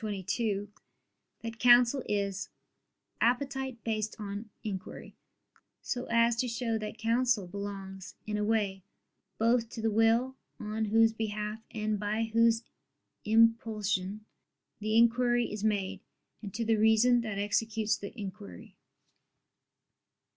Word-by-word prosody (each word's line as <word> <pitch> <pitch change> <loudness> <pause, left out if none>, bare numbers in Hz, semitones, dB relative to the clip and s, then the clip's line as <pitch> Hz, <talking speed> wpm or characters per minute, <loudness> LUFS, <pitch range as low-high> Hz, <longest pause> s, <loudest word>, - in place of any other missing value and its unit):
ii, - - -2 0.2
22) 205 +1 -1 0.8
that 230 0 -6
counsel 245 +2 +6
is 200 -1 -1 0.7
"appetite 265 0 0
based 215 -1 -2
on 205 +1 -6
inquiry," 190 -3 -6 0.6
so 250 0 -4
as 235 0 +3
to 250 +2 0
show 230 -1 -2
that 215 -1 -4
counsel 230 -2 +1
belongs, 195 0 -7
in 210 - -3
a 210 - 0
way, 205 -3 0 0.6
both 230 0 +2
to 230 - -8
the 225 0 0
will, 225 +4 +3 0.2
on 215 +1 -2
whose 225 +1 +4
behalf 215 -1 -3
and 215 -2 -2
by 210 +2 -1
whose 230 0 +4 0.6
impulsion 215 -3 +2 0.5
the 215 +1 0
inquiry 240 +1 +4
is 210 -1 -5
made, 205 -3 -1 0.4
and 205 -3 -7
to 230 +1 -1
the 225 0 +2
reason 220 +3 +4
that 215 -3 -4
executes 215 +1 0
the 200 - -7
inquiry. 100 - -9
220 Hz, 125 wpm, -30 LUFS, 205-230 Hz, 0.8 s, counsel